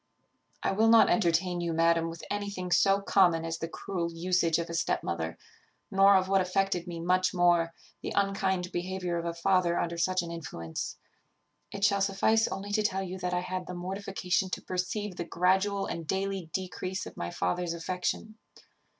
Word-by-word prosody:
"I - - +1
will 215 +3 +3
not 225 0 +7
entertain 175 -3 +2
you, 170 -1 -1
madam, 165 0 +3
with 165 0 -9
anything 200 -3 -3
so 195 +2 +4
common 175 -5 +3
as 165 0 -3
the 165 - -3
cruel 170 -1 -4
usage 170 -1 +1
of 170 0 -2
a 170 - -6
step 165 - 0
mother; 80 -1 -3 0.5
nor 195 +1 +6
of 185 0 +3
what 195 0 +3
affected 185 -1 0
me 170 -1 -5
much 185 +2 +1
more, 175 -1 +3 0.3
the - - -4
unkind 195 -2 0
behaviour 180 -1 -2
of 170 - -5
a 170 - -2
father 175 0 +2
under 170 0 -2
such 185 +1 +1
an 170 - -6
influence. 85 - -5 0.7
It 200 - -6
shall 200 -1 +3
suffice 210 +3 +3
only 200 +1 -5
to 215 +1 +2
tell 195 -2 0
you 185 0 -6
that 180 0 -1
I 180 - 0
had 185 0 -4
the 180 - -5
mortification 190 0 -2
to - - -3
perceive 185 +1 -3
the - - -2
gradual 190 +4 +1
and 165 -2 -5
daily 190 -2 -2
decrease 185 +1 -4
of - - -10
my 85 - -4
father's 165 - -1
affection. 185 +6 -3
180 Hz, 185 wpm, -29 LUFS, 170-195 Hz, 0.7 s, not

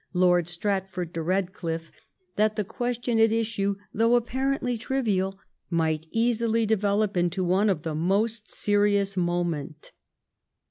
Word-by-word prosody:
Lord 180 -2 +3
Stratford 185 -1 -2
de 165 - -3
Bedcliffe, 170 -2 -2 0.4
that 215 0 +2
the 210 - 0
question 240 +2 -2
at 225 0 +6
issue^. 215 -3 0 0.2
thoiigh 230 +2 +4
apparently 255 +1 -1
triyial, 215 -6 -1 0.3
might 160 -2 0
easily 230 0 +1
deyelop 210 -1 +1
into 175 +1 +1
one 190 +4 +2
of 170 -5 -1
most 200 +8 0
serious 205 -1 +1
moment. 175 -4 -2
200 Hz, 120 wpm, -26 LUFS, 175-225 Hz, 0.4 s, at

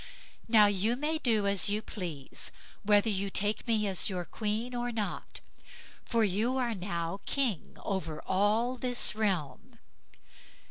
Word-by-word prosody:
Now 220 -2 +7
you 205 +3 +1
may 305 +4 -1
do 225 -7 +2
as 200 0 +3
you 210 +1 0
please, 170 -11 -6 0.3
whether 205 +1 +3
you 200 -2 0
take 210 +4 0
me 220 -2 +2
as 195 +1 +4
your 180 -2 -3
queen 220 +5 -3
or 245 0 -2
not, 215 -3 -4 0.6
for 230 -2 +1
you 215 +6 0
are 245 -3 0
now 175 -2 -4
king 250 - -1
over 165 -6 -3
all 215 +6 +1
this 245 -1 +3
realm." 210 - -2
210 Hz, 140 wpm, -30 LUFS, 195-235 Hz, 0.6 s, Now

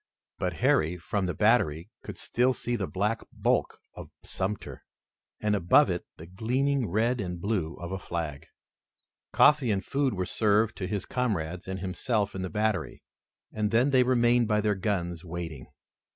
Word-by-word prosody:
But - - -1
Harry, 80 +3 +2
from 95 +2 -2
the 90 - -2
battery, 80 +7 +2
could - - -8
still 125 +2 +1
see 120 - -2
the 100 -5 -2
black 105 +4 -1
bulk - - 0 0.2
of - - -10
Sumter, 95 +2 -4 0.6
and 105 -1 +1
above 90 -3 +4
it - - -4
the 80 - -10
gleaming 125 +7 0
red 115 +5 +1
and 90 -2 -4
blue 90 -4 -1
of 85 +1 -7
a 95 - -3
flag. 80 -5 -5 0.8
Coffee 150 -5 +5
and 100 -2 0
food 135 -4 0
were 90 -1 -1
served 105 +2 +2
to 90 - -3
his 100 +1 -3
comrades 90 -10 -2
and 95 0 -4
himself 100 +3 -1
in 95 - -4
the 95 - -3
battery, 105 -4 -1 0.5
and 105 -1 0
then 120 +6 +3
they 130 -1 +5
remained 120 -1 +3
by 105 -1 +2
their 105 0 +2
guns 90 -4 -2
waiting. 80 -6 -6
100 Hz, 165 wpm, -28 LUFS, 90-115 Hz, 0.8 s, Coffee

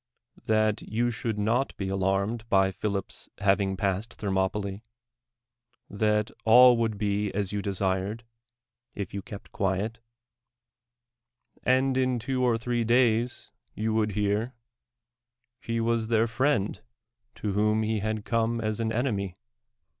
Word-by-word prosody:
That 110 -1 +2
you 120 +3 -1
shoiiki 115 -2 -3
not 115 +6 0
be 95 - -3
alarmed 100 +4 -1
by 95 -1 +4
Philip's 100 0 -4
hav 100 0 +3
ing 95 -1 -1
passed 100 +3 -2
Thermopyla' 100 0 -1 0.6
— 120 +1 -48
that 105 0 +2
all 125 +2 +8
would 110 -2 0
be 105 0 0
as 100 -1 -1
you 105 -1 -2
desired, 100 +3 -2 0.7
if 100 -4 -5
you 100 - -3
kept 105 -4 -10
quiet; 100 +4 -1 1.6
and 130 +1 +2
in 130 -1 +1
two 125 +2 -2
or 120 -2 +3
three 120 +1 -1
days 120 0 +2 0.2
yon 110 +1 -1
would 110 -2 +1
hear, 105 +5 0 1.0
he 115 -3 -3
Avas 115 -1 0
their 115 0 +3
friend 115 -2 0 0.5
to 105 -2 -3
whom 105 +2 +2
he 110 0 0
had 110 0 -3
come 115 0 0
as 110 -1 -2
an 115 -1 0
eneniy. 110 -6 -1
110 Hz, 135 wpm, -27 LUFS, 100-115 Hz, 1.6 s, all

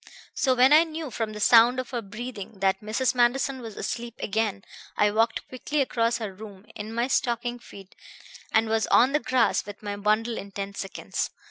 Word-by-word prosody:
"So 260 -2 +2
when 255 +3 +6
I 315 +2 +8
knew 320 -3 -6
from 220 -2 -3
the 210 - -7
sound 235 +3 +6
of 255 0 -5
her 240 -2 -2
breathing 215 0 -7
that 190 0 +1
Mrs. 220 +5 0
Manderson 255 +2 +1
was 225 -3 -9
asleep 235 -1 -4
again 210 -2 -2 0.3
I 210 0 +3
walked 225 +2 0
quickly 290 +4 -3
across 235 -3 +1
her 215 -4 -5
room 200 0 -12
in 215 +1 -6
my 235 +2 0
stocking 240 -1 -1
feet 195 -4 -14 0.6
and 220 0 +3
was 220 0 +1
on 255 +3 +5
the 295 - +2
grass 245 -1 +1
with 205 +1 -11
my 205 -1 -3
bundle 215 +3 0
in 200 0 -10
ten 200 0 -5
seconds. 195 -1 -4
225 Hz, 195 wpm, -26 LUFS, 210-250 Hz, 0.6 s, I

